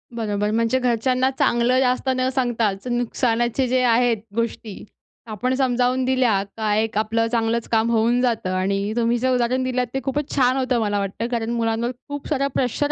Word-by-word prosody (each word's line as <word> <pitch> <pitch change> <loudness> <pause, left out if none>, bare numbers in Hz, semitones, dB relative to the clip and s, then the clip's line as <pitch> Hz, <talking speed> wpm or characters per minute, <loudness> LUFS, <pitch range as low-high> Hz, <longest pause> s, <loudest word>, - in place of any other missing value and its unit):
बरोबर. 210 -2 -1
म्हणजे 230 +3 +1
घरच्यांना 255 +1 +1
चांगलं 240 +2 +2
जास्त 255 0 +1
न 255 - +1
सांगताच 235 -4 -1
नुकसानाचे 240 +1 0
जे 255 +1 +1
आहेत 240 -1 +3 0.2
गोष्टी 230 -3 -4 0.5
आपण 250 +5 -1
समजावून 255 -1 +1
दिल्या 250 -6 +2
का 215 -2 0
एक 220 0 -1
आपलं 225 +1 +1
चांगलंच 230 -1 0
काम 225 0 +2
होऊन 235 +2 +2
जातं 230 -7 0
आणि 195 +2 -1
तुम्ही 235 +1 +2
जे 260 +2 0
उदाहरण 250 +1 +1
दिलतं 250 -2 -2
ते 270 - -1
खूपच 285 +1 -2
छान 255 -1 +3
होतं 255 -2 0
मला 205 -2 0
वाटतं. 200 +4 -3
कारण 230 -1 -2
मुलांवर 230 0 -1 0.2
खूप 285 -1 -6
सारा 275 -2 0
प्रेशर 270 +3 0
235 Hz, 170 wpm, -22 LUFS, 225-255 Hz, 0.5 s, आहेत